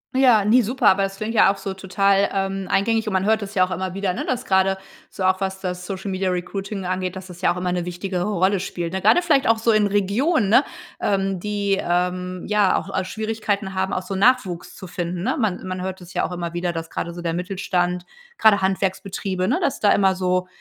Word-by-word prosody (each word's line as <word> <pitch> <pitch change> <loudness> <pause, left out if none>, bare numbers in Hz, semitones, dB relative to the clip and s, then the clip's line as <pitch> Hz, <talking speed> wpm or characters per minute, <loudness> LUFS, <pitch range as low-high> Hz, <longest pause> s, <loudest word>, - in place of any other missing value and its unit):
Ja, 245 -6 +5
ne, 235 +5 +5
super, 245 +1 0
aber 195 +1 +5
das 195 0 -3
klingt 215 +3 -4
ja 205 - +6
auch 200 - -6
so 195 0 -5
total, 195 +1 +2
ähm, 195 0 -2
eingängig, 225 +3 +2
und 210 - -1
man 190 0 +1
hört 220 +1 +2
das 205 +1 -7
ja 185 -1 +5
auch 185 - -10
immer 185 0 -3
wieder, 195 -1 -1
ne, - - -4
dass 255 0 -2
grade 190 -2 +2 0.3
so, 190 - -6
auch 185 +1 +2
was 190 0 -2
das 180 -1 -4
Social-Media-Recruiting 190 +1 -3
angeht, 185 0 -2
dass 185 0 -8
das 180 -1 -12
ja - - +3
auch - - -8
immer 180 0 -1
'ne 180 -1 -1
wichtigere 180 +1 -3
Rolle 195 -1 +1
spielt. 175 -2 -4
Grade 355 - +5
vielleicht 295 -6 +2
auch 225 0 +4
so 230 +1 +2
in 215 -1 +4
Regionen, 205 - +1
ne, 240 +6 +6 0.4
ähm, 195 -1 0
die, 205 -1 0
ähm, 180 +1 -1
ja, 210 -2 +3
auch, 195 - -4
äh, 190 - +1
Schwierigkeiten 215 -1 -3
haben, 190 +1 -1
auch 185 - -1
so 190 +1 -5
Nachwuchs 195 -4 +1
zu 190 - -9
finden, 175 0 -4
ne? - - 0
Man 205 -6 -1
man 185 0 -4
hört 190 0 -4
das 180 +1 -13
ja - - 0
auch - - -5
immer 170 -1 -4
wieder, 175 0 -1
dass 165 -1 -5
gerade 170 - -4
so 175 - -7
der 170 -1 -2
Mittelstand, 180 0 -1 0.3
grade 215 -2 +5
Handwerksbetriebe 190 0 -1
ne, 300 +8 +1
dass 285 - -1
da 205 - +5
immer 190 -1 +3
so 185 0 0
190 Hz, 230 wpm, -22 LUFS, 180-205 Hz, 0.4 s, ja